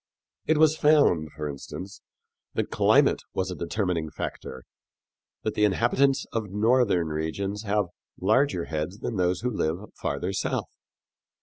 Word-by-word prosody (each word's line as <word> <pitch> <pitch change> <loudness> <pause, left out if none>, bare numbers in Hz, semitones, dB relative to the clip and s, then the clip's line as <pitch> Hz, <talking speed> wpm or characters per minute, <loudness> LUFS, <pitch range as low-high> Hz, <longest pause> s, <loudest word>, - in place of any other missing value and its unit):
It 160 - +3
was 155 0 +5
found, 145 - +4
for 75 -1 -4
instance, 80 +7 -8 0.5
that - - -1
climate - - +4
was 95 0 -1
a - - -4
determining 85 -2 -1
factor 65 -3 -6 0.8
that 110 - -1
the 105 - +1
inhabitants 120 +6 +2
of 110 -3 -2
northern 105 -4 +2
regions 90 +7 -3
have 105 0 +1 0.3
larger 105 -2 +2
heads 80 +5 -3
than 115 -1 -4
those 90 0 +1
who 125 +1 -1
live 90 0 -2
farther 90 +7 -3
south. 95 - -2
95 Hz, 135 wpm, -26 LUFS, 85-115 Hz, 0.8 s, was